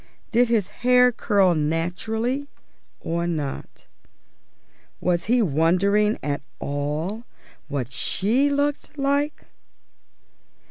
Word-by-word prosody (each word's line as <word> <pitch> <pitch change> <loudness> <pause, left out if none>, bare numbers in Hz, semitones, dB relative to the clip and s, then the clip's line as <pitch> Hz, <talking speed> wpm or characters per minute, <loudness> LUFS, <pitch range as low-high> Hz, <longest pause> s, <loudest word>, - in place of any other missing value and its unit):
Did 240 +1 +4
his 225 -5 +1
hair 250 0 +5
curl 200 -6 +2
naturally 185 - -1 0.5
or 170 +1 -2
not? 150 -5 -5 1.1
Was 175 -1 0
he 240 +2 +3
wondering 195 +6 +2
at 145 0 -2 0.2
all 150 +10 -3 0.4
what 135 -4 -3
she 225 - +1
looked 285 +1 -1
like? 280 +2 0
200 Hz, 90 wpm, -23 LUFS, 165-245 Hz, 1.1 s, hair